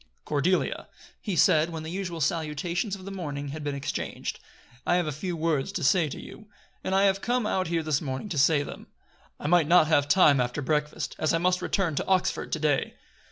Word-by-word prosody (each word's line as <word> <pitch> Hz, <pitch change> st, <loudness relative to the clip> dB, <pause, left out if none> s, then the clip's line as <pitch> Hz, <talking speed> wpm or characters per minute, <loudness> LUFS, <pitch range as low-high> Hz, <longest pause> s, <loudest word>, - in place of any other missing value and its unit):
"Cordelia," 175 Hz, +6 st, 0 dB, 0.3 s
he 200 Hz, -5 st, -3 dB
said, 155 Hz, 0 st, +4 dB
when 160 Hz, -2 st, -6 dB
the 160 Hz, -, -6 dB
usual 180 Hz, -3 st, -4 dB
salutations 170 Hz, -, -1 dB
of 185 Hz, -1 st, -12 dB
the 195 Hz, -, -6 dB
morning 145 Hz, -7 st, -5 dB
had 155 Hz, +2 st, -6 dB
been 145 Hz, -1 st, -2 dB
exchanged, 140 Hz, 0 st, -4 dB, 0.4 s
"I 175 Hz, -, +2 dB
have 175 Hz, -1 st, +1 dB
a 155 Hz, -, -2 dB
few 170 Hz, +4 st, -4 dB
words 155 Hz, -4 st, 0 dB
to -, -, -3 dB
say 160 Hz, +3 st, +3 dB
to -, -, -7 dB
you; 215 Hz, -, -11 dB, 0.4 s
and 190 Hz, -, -1 dB
I 195 Hz, -, +4 dB
have 195 Hz, 0 st, +2 dB
come 245 Hz, -1 st, 0 dB
out 190 Hz, -4 st, 0 dB
here 165 Hz, -1 st, -1 dB
this 155 Hz, -2 st, 0 dB
morning 130 Hz, +4 st, -4 dB
to 165 Hz, -, -3 dB
say 145 Hz, +1 st, +4 dB
them. -, -, -9 dB, 0.5 s
I -, -, -9 dB
might 165 Hz, 0 st, +4 dB
not 175 Hz, -1 st, +6 dB
have 145 Hz, -2 st, +2 dB
time 145 Hz, -5 st, +5 dB
after 125 Hz, +3 st, -2 dB
breakfast, 150 Hz, +1 st, -1 dB
as 155 Hz, +1 st, +2 dB
I -, -, +3 dB
must 180 Hz, +2 st, +1 dB
return 190 Hz, -6 st, 0 dB
to -, -, -1 dB
Oxford 190 Hz, -1 st, 0 dB
to 155 Hz, -, 0 dB
day." 150 Hz, -3 st, 0 dB
160 Hz, 215 wpm, -27 LUFS, 150-185 Hz, 0.5 s, not